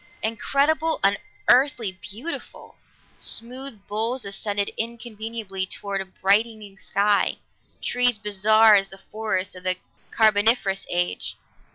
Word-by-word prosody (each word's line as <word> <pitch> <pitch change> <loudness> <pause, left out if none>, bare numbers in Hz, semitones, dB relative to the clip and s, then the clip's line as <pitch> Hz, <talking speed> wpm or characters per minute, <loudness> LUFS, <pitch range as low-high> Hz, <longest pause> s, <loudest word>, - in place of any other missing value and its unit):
Incredible, 295 +8 +1
unearthly, 240 +3 +2
beautiful! 210 - -8 0.4
Smooth 240 -2 -3
boles 225 +3 -1
ascended 200 0 -2
inconceivably 225 -4 -4
toward 200 0 -3
a - - -6
brightening 200 +1 0
sky, 200 +1 +1 0.5
trees 245 -2 +3
bizarre 210 +2 +5
as 195 -1 +4
the 195 - -10
forests 200 -2 -3
of 180 - -10
the 185 0 0 0.3
Carboniferous 210 -2 +3
age. 175 - -1
215 Hz, 100 wpm, -24 LUFS, 195-235 Hz, 0.5 s, bizarre